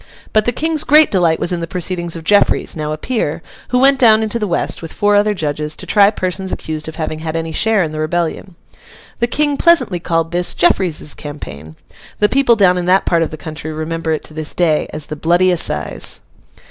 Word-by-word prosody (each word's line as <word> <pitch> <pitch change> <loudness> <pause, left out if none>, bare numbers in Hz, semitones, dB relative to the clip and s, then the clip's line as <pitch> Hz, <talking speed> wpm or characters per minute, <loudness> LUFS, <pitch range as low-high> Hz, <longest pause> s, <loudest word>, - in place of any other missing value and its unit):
But 215 -1 +3
the 245 - +1
King's 315 +4 -1
great 305 +3 +5
delight 170 -4 +2
was - - -1
in 175 - -1
the 165 - -4
proceedings 175 -1 -3
of 165 - -7
Jeffreys, 205 +5 +2
now 155 -1 -4
a 155 - -3
peer, 165 -6 -3 0.2
who 250 - 0
went 270 +1 +4
down 220 -3 +5
into 220 +2 -2
the 210 - -2
west, 170 - -1
with 165 - -7
four 205 0 +1
other 210 +1 +2
judges, 150 -2 -3
to - - -6
try 200 -1 +4
persons 190 -2 -3
accused 155 -1 -5
of 160 - -7
having 155 -1 -4
had 160 0 -5
any 165 0 -3
share 215 +4 +1
in 155 - -4
the 155 - -6
rebellion. 170 +3 -3 0.6
The 235 - +1
King 290 +3 0
pleasantly 335 - +3
called 165 -1 -1
this 175 0 -1
'Jeffreys's 175 -4 +1
campaign.' 80 - -9 0.4
The 210 - +2
people 265 -3 +3
down 180 -4 +3
in 175 - -4
that 190 +1 +3
part 170 -1 +1
of 165 - 0
the 155 - -8
country 155 0 -7
remember 160 +1 -3
it 155 - -2
to - - -8
this 155 0 -2
day 160 -4 +1
as 150 - -6
The 150 - -6
Bloody 175 +4 +2
Assize. 75 - 0
175 Hz, 220 wpm, -16 LUFS, 155-210 Hz, 0.6 s, great